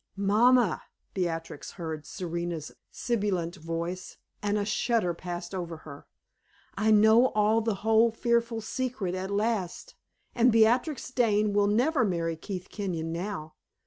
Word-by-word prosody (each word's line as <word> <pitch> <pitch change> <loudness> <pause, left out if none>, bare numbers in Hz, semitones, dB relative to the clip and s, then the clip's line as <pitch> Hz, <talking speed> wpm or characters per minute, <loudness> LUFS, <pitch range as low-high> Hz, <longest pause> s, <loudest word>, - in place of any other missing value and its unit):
"Mamma," 215 +1 +3 0.3
Beatrix 165 -5 -4
heard 160 -4 -6
Serena's 170 -3 -4 0.2
sibilant 195 -7 -2
voice, 170 +2 -5 0.2
and 205 0 0
a 205 - -1
shudder 215 -3 +1
passed 175 +1 -6
over 170 -3 -4
her 140 -2 -11 0.7
"I 215 +2 +1
know 220 +3 +6
all 215 +2 +3
the 225 -2 -1
whole 225 +1 +5
fearful 235 0 0
secret 240 -5 -3
at 185 +1 -4
last, 210 - -2 0.4
and 240 +1 +4
Beatrix 245 +6 +2
Dane 215 -4 +2
will 205 0 +3
never 250 +7 +2
marry 170 -5 -1
Keith 185 +2 -6
Kenyon 170 -6 -3
now. 170 -3 -5
205 Hz, 130 wpm, -28 LUFS, 175-225 Hz, 0.7 s, know